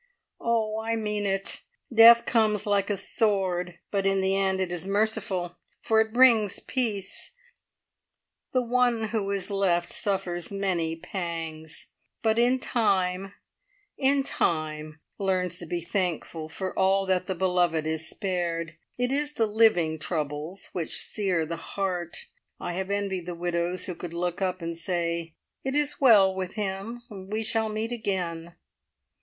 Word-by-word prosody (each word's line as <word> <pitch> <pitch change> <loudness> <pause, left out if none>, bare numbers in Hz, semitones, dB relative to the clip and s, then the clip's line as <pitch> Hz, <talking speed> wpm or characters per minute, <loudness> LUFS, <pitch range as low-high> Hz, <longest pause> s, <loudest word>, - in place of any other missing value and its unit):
"Oh, 220 -2 0
I 225 +1 -1
mean 210 -2 -1
it. 195 0 -1 0.3
Death 235 +1 +9
comes 215 -3 +2
like 200 -1 +1
a 205 - 0
sword, 185 -4 0
but 195 -1 +1
in 195 0 +2
the 190 0 +2
end 190 -1 +1
it 185 -2 -1
is 175 +1 -4
merciful, 195 -4 0 0.2
for 220 0 +3
it 220 0 -1
brings 230 -4 +5
peace. 220 - -2 1.2
The 255 -1 +2
one 240 -2 +2
who 210 -3 -1
is 200 0 -2
left 175 -3 +1
suffers 190 -4 -1
many 180 -5 -1
pangs, 165 -3 -6 0.3
but 220 0 +3
in 245 +2 +4
time 195 -6 0 0.6
in 275 0 +3
time, 155 - -1 0.2
learns 185 -2 0
to 170 - -4
be 175 +1 -2
thankful 170 -3 -2
for 185 +3 -4
all 195 +1 +3
that 185 -1 0
the 190 - -1
beloved 175 -3 +1
is 160 0 -2
spared. 170 -4 -2 0.2
It 245 +1 0
is 295 +2 0
the 230 - +2
living 205 -8 +3
troubles 155 +3 -3
which 170 -3 -2
sear 185 -6 0
the 165 +2 -4 0.2
heart. 180 -3 -2 0.3
I 175 - -4
have 190 +2 -3
envied 195 -3 -2
the 175 - -4
widows 175 +1 -1
who 180 - -2
could 170 0 -7
look 175 +1 -2
up 185 -2 -1
and 165 0 -3
say, 170 -1 -2 0.3
`It 265 +1 -2
is 295 -1 +1
well 205 -7 +7
with 190 -1 -4
him. 210 +3 -3
We 205 +2 -4
shall 220 0 0
meet 215 +2 -3
again.' 175 -7 -3
190 Hz, 150 wpm, -27 LUFS, 175-215 Hz, 1.2 s, Death